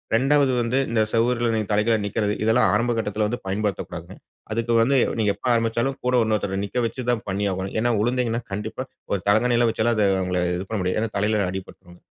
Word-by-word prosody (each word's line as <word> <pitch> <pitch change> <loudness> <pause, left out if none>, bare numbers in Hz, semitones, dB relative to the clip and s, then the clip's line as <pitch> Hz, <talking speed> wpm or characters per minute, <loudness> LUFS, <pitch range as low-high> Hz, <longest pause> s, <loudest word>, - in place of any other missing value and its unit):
2வது 135 +2 +3
வந்து 120 +2 0
இந்த 115 -1 +2
சுவருல 120 +1 +1
நீங்க 110 -2 -1
தலை 105 0 +3
கீழா 115 -1 +4
நிக்கிறது. 105 0 -1
இதெல்லாம் 115 +3 +3
ஆரம்ப 120 +1 +1
கட்டத்தில 105 -1 -1
வந்து 120 +3 -3
பயன்படுத்தக்கூடாதுங்க. 100 0 -3 0.4
அதுக்கு 115 +1 -1
வந்து 135 +5 +3 0.2
நீங்க 105 -2 +2
எப்ப 100 - -14
ஆரம்பிச்சாலும் 115 +3 0
கூட 125 0 +2
இன்னொருத்தர 105 -3 -1
நிக்க 100 - -6
வச்சு 125 +3 -4
தான் 120 -3 -1
பண்ணியாகணும். 95 -1 -2
ஏனா 120 - +2
உழுந்தீங்கன்னா, 120 0 0
கண்டிப்பா 105 +5 -4 0.3
ஒரு 100 - +1
தலகாணிலாம் 120 +2 +3
வைச்செல்லாம் 115 +1 0
அத 105 -2 +3
அவுங்கள 90 -1 -1 0.2
இது 95 +2 -6
பண்ண 110 - -2
முடியாது. 90 +3 0
ஏன்னா, 115 - -1
தலையில 105 0 +1
அடிபட்ரும். 90 -1 -9
110 Hz, 190 wpm, -23 LUFS, 100-120 Hz, 0.4 s, கீழா